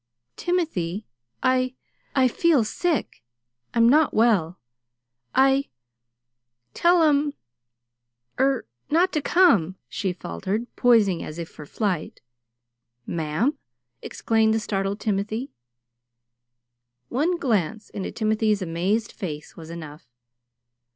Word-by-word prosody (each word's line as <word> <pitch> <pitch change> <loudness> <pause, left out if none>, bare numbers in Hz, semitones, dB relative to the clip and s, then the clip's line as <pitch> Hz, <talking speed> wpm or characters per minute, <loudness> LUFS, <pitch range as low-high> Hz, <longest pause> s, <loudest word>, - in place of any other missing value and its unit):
"Timothy, 220 - -1 0.4
I 255 0 +2 0.4
I 260 -2 +5
feel 295 0 +3
sick. 330 +8 -2 0.5
I'm 230 0 +5
not 300 +4 +4
well. 200 -7 +3 0.8
I 270 +1 +4 1.0
tell 345 0 +4
'em 290 -1 +2 1.0
er 270 -2 +2 0.2
not 350 +4 +3
to 305 - +1
come," 225 - +4
she 190 - -2
faltered, 185 - -4
poising 215 -8 +4
as 155 - -7
if 170 -1 -5
for 150 - -11
flight. 190 -5 -2 0.9
"Ma'am!" 170 - -1 0.4
exclaimed 220 -1 +1
the - - +1
startled 200 -2 -2
Timothy. 215 +5 -2 1.6
One 325 +8 +1
glance 220 - -1
into 195 - -4
Timothy's 215 -2 +1
amazed 185 +6 -1
face 155 -8 -7
was 160 -1 -10
enough. 155 -4 -9
220 Hz, 100 wpm, -24 LUFS, 185-270 Hz, 1.6 s, I